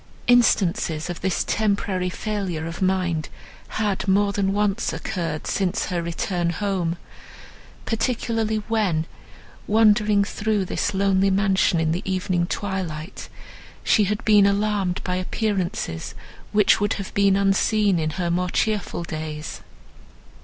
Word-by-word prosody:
Instances 180 -9 +2
of 175 - -8
this 190 0 0
temporary 200 -3 0
failure 185 -5 -3
of 165 +3 -6
mind 180 -4 0 0.5
had 205 -2 -1
more 200 +1 +3
than 195 -1 +1
once 205 +2 0
occurred 170 -6 -4
since 195 +2 0
her 175 -2 -2
return 170 +1 -2
home; 180 -2 -1 0.9
particularly 225 -2 -1
when, 195 -8 +1 0.6
wandering 210 -1 +4
through 210 0 -1
this 205 +2 -2
lonely 195 0 +3
mansion 190 -3 +2
in 160 -1 +1
the 175 +3 -1
evening 185 -2 -1
twilight, 185 -5 -4 0.5
she 210 - +4
had 210 +3 -2
been 205 -2 +6
alarmed 200 -2 0
by 180 0 -1
appearances, 185 - -2 0.4
which 210 0 +4
would 205 - +1
have 195 -2 -6
been 200 -1 +3
unseen 200 0 +2
in 155 -1 0
her 175 -2 0
more 180 +1 0
cheerful 210 -3 -1
days. 155 -2 -6
195 Hz, 125 wpm, -23 LUFS, 175-210 Hz, 0.9 s, been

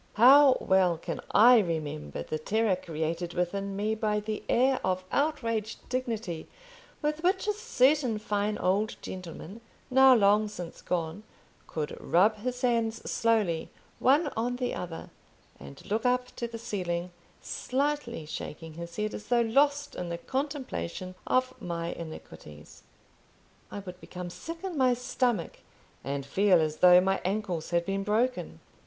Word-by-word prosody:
How 265 +4 +8
well 185 -3 +3
can 165 +1 -5
I 240 +3 +7
remember 150 - -3
the 155 - -4
terror 215 +4 +1
created 165 0 -4
within 195 +3 -2
me 210 +2 0
by 215 -1 0
the 215 0 -4
air 260 +2 +3
of 185 0 0
outraged 230 -7 -1
dignity 225 -10 -3 0.6
with 300 +1 -1
which 375 +4 +1
a 420 - +2
certain 265 - +2
fine 210 0 -1
old 205 +4 0
gentleman, 185 +3 -8 0.3
now 265 0 +7
long 210 0 +4
since 180 -5 -8
gone, 170 +2 -2 0.5
could 150 -2 -4
rub 205 +6 +3
his 250 +3 -4
hands 230 -2 0
slowly, 215 -8 +1 0.3
one 290 +4 +4
on 240 +2 -1
the 250 -1 -2
other, 170 -2 -6 0.5
and 70 0 -12
look 220 +2 -1
up 250 0 0
to 235 - -2
the 230 0 -7
ceiling, 180 -6 -3 0.3
slightly 265 - -2
shaking 160 +1 -7
his 170 +1 -8
head, 215 0 -2
as 210 - -8
though 240 -1 +3
lost 285 +5 +2
in 180 -1 -5
the 170 - -3
contemplation 260 - -4
of 255 0 +2
my 170 -2 -3
iniquities! 75 - -11 0.9
I - - -7
would 180 -1 -10
become 180 -1 -7
sick 330 - -8
in 375 -3 -4
my 255 -2 +4
stomach, 245 -5 -1 0.4
and 140 0 -3
feel 185 +5 +4
as 155 -1 -1
though 180 +1 +7
my 195 +1 0
ankles 185 -4 -2
had 170 0 +1
been 195 +1 -2
broken. 230 +5 -1
210 Hz, 150 wpm, -29 LUFS, 175-250 Hz, 0.9 s, How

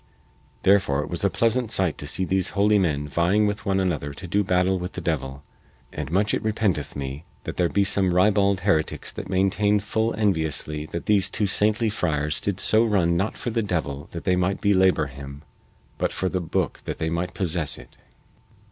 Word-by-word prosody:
Therefore 85 -8 +3
was 85 +3 -3
it - - +5
a - - -1
pleasant 115 +3 +1
sight 95 -7 +1
to 75 - -5
see 95 - 0
these 95 0 +1
holy 105 +1 +4
men 75 -6 0
vying 90 +8 +2
with 105 0 -2
one 95 0 +2
another 75 -6 -1
to 90 - -8
do 100 +4 +1
battle 90 0 +1
with 90 +1 -5
the - - -5
devil, 70 -5 -3 0.5
and 75 -1 -5
much 105 +4 +1
it - - 0
repenteth 105 -9 -1
me 70 +2 -5 0.2
that - - -6
there 90 -2 +2
be 100 - +2
some 100 -2 +2
ribald 100 +1 +3
heretics 80 -5 0
that - - -7
maintain 100 +2 +2
full 110 +2 -1
enviously 80 -7 -1
that 85 - -6
these 100 -2 +3
two 105 - 0
saintly 105 +2 +1
friars 75 -6 -1
did 100 -1 -2
so 110 +1 +4
run 95 -7 +2
not 95 +5 -1
for 120 - -3
the 115 0 0
devil 80 -8 -3
that 85 - -7
they 90 - +2
might 90 +2 0
belabor 95 -5 +3
him, 70 +1 -10 0.6
but - - 0
for 95 - -1
the 95 -1 -2
booke 85 - -2
that - - -4
they 80 -1 -2
might 85 +2 -3
possess 85 -4 -2
it. - - -15
95 Hz, 200 wpm, -24 LUFS, 80-100 Hz, 0.6 s, it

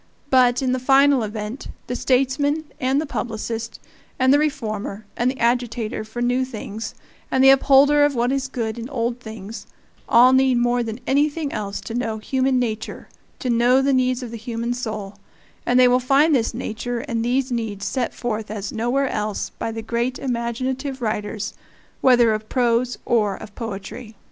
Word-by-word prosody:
But, 255 0 +4
in 255 - +1
the 255 - 0
final 270 +1 +4
event, 215 +3 -5 0.2
the 245 - -4
statesman, 275 +5 +1 0.2
and 265 +2 +1
the 315 - -1
publicist, 230 -3 -4 0.4
and 260 0 +4
the 290 - +5
reformer, 215 -8 -3
and 240 +2 +1
the 260 - -4
agitator 235 -2 0
for 220 +3 -5
new 250 +2 +2
things, 225 -3 -6 0.3
and 260 - +2
the 270 - +9
upholder 280 +2 +5
of 290 -1 +2
what 240 +1 +1
is 270 -1 -1
good 235 -3 -3
in 235 +2 -6
old 235 -2 -2
things, 220 -2 -9 0.4
all 250 +2 +7
need 260 -1 +4
more 240 0 +2
than 225 +1 -5
anything 290 +2 +1
else 200 -1 -3
to 225 - -7
know 230 -2 -2
human 260 +3 0
nature, 220 -3 -3 0.3
to 255 - -2
know 240 +2 +4
the 275 +1 +2
needs 255 0 +1
of 240 - -7
the 230 - -6
human 235 +1 -3
soul; 215 -5 -5 0.5
and 245 +1 +4
they 250 - +7
will 250 +1 +4
find 275 +5 +3
this 235 -5 +2
nature 235 +2 -4
and 230 -5 -2
these 255 +2 0
needs 220 -4 -3
set 255 -3 -1
forth 220 -3 -4
as 205 -2 -4
nowhere 245 +5 0
else 210 -3 -3
by 225 - -4
the 225 0 -6
great 235 +3 -1
imaginative 255 +2 -3
writers, 210 -1 -3 0.5
whether 240 -3 +5
of 215 0 -5
prose 245 -1 +1
or 210 -4 +2
of 205 - -11
poetry. 220 +1 -7
245 Hz, 180 wpm, -22 LUFS, 225-260 Hz, 0.5 s, the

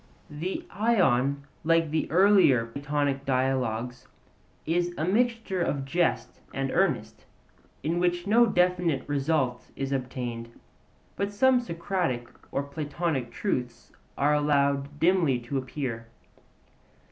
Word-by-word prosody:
The 165 +6 -4
Ion, 140 - +2 0.2
like 165 -1 +2
the 155 0 0
other 165 - -1
earlier 190 - +5
Platonic 140 +2 -2
Dialogues, 125 -2 -1 0.6
is 175 +2 0
a 155 - -1
mixture 225 -1 0
of 140 -5 -1
jest 135 -6 0 0.2
and 135 -1 -1
earnest, 140 - 0 0.6
in 165 +4 0
which 175 0 0
no 230 +4 +5
definite 180 -7 +1
result 140 -3 0
is 135 0 -3
obtained, 120 -3 -4 0.6
but 200 0 -2
some 255 +5 +4
Socratic 170 - -2 0.2
or 140 - -1
Platonic 145 -2 -3
truths 125 - -3 0.3
are 145 +2 +3
allowed 140 -1 +1
dimly 165 -6 +3
to 125 +3 -2
appear. 125 -4 -5
145 Hz, 115 wpm, -27 LUFS, 130-175 Hz, 0.6 s, earlier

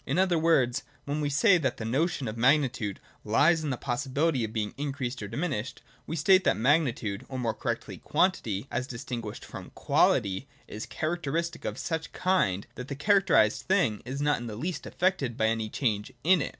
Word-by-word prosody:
In - - -2
other 185 -3 +3
words, 140 -6 +3 0.2
when 145 +2 -2
we 145 - 0
say 180 +6 +4
that 135 -6 -1
the 110 - -5
notion 135 +3 0
of 110 - -4
magnitude 125 -4 +2 0.2
lies 150 +10 +3
in 150 - -2
the 130 - -1
possibility 135 +3 0
of 110 - -3
being 110 -2 -2
increased 135 -3 -3
or 105 - -4
diminished, 130 - -3 0.2
we 160 - -3
state 185 +5 +5
that - - +2
magnitude 120 -6 +1
(or 130 - -5
more 115 -3 -1
correctly, - - -4
quantity), 115 - 0
as 125 +2 -2
distinguished 115 -3 -6
from - - -9
quality, 95 +7 +2 0.2
is 105 +2 -6
a - - -20
characteristic 170 +1 -2
of - - -3
such 160 -1 -3
kind 180 - +1
that 125 - -7
the 140 - -4
characterised 140 - +3
thing 180 - +2
is 135 +4 -4
not 145 0 +2
in 120 - -6
the 110 - -6
least 170 +10 -4
affected 175 -10 0
by 110 - +2
any 110 -1 0
change 105 -5 -1
in 180 +1 +5
it. - - -2
135 Hz, 190 wpm, -28 LUFS, 115-160 Hz, 0.2 s, state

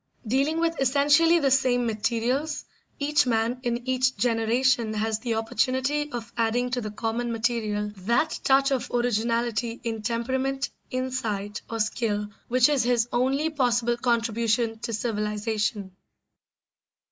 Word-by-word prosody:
Dealing 275 +8 +1
with 330 -3 0
essentially 290 +5 +4
the 280 -5 +2
same 255 -2 +3
materials, 235 +7 -1 0.3
each 285 -1 +2
man 230 +1 +1
in 240 0 -3
each 255 0 +1
generation 230 -1 +1
has 220 0 -1
the 235 -1 -2
opportunity 260 +6 0
of 235 -2 -6
adding 240 +2 0
to 250 -1 -1
the 215 - -4
common 230 +2 -2
material 220 -3 -1
that 235 - 0
touch 275 +1 +4
of 265 -2 -1
originality 235 0 0
in 225 -2 -3
temperament, 260 +4 -1 0.2
insight, 225 -6 -3
or 230 - -4
skill 210 -1 -1 0.2
which 250 0 +4
is 290 -3 +2
his 235 -1 +2
only 270 +6 +1
possible 240 -4 +1
contribution 230 -1 0
to 230 - -4
civilisation. 210 -2 -2
240 Hz, 130 wpm, -26 LUFS, 225-260 Hz, 0.3 s, essentially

